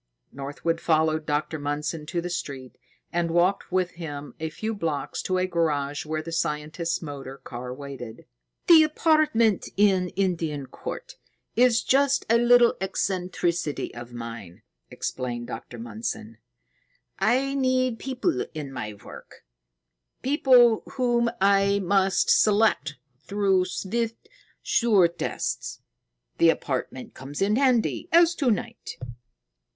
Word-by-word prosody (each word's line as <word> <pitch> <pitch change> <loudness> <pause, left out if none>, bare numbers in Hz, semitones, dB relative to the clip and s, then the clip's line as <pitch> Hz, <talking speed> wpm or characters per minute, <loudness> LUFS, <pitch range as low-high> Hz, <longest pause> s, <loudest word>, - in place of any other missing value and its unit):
Northwood 145 +4 -3
followed 155 -1 +1
Dr. 150 +1 -1
Mundson 150 +2 -3
to 170 +1 -2
the 175 - -4
street 135 -6 -5 0.4
and 170 0 0
walked 175 +4 +1
with 185 -1 +1
him 145 -4 -7
a 160 0 -3
few 220 +8 -4
blocks 160 -8 -3
to 185 - -1
a 185 - +1
garage 150 -5 -1
where 155 0 -2
the 165 - -7
scientist's 165 +1 -2
motor 135 -3 -7
car 125 -1 -7
waited. 130 -4 -8 0.4
"The 330 -2 +8
apartment 305 - +2
in 190 -3 +3
Indian 165 -7 -1
Court - - -8 0.4
is 240 -1 +4
just 280 +1 +2
a 230 - +5
little 240 0 +6
eccentricity 180 -4 -2
of 120 0 -9
mine," 115 -7 -8 0.3
explained 120 -2 -4
Dr. 120 - -8
Mundson. 115 -1 -6 0.8
"I 255 +7 +2
need 255 -3 +1
people 265 +6 -1
in 145 -3 -6
my 105 -5 -5
work, 100 - -13 0.8
people 250 -5 +5
whom 240 -3 +2
I 200 0 +4
must 195 0 +2
select 210 -9 +3 0.2
through 195 +2 +1
swift, 225 +5 -3 0.4
sure 210 -7 +4
tests. 60 - -4 0.6
The 165 - +6
apartment 130 -4 -2
comes 135 +2 -8
in 200 +2 +2
handy, 255 +4 +1
as 340 0 +6
to 275 -5 +2
night." 210 - -3
175 Hz, 125 wpm, -25 LUFS, 145-225 Hz, 0.8 s, The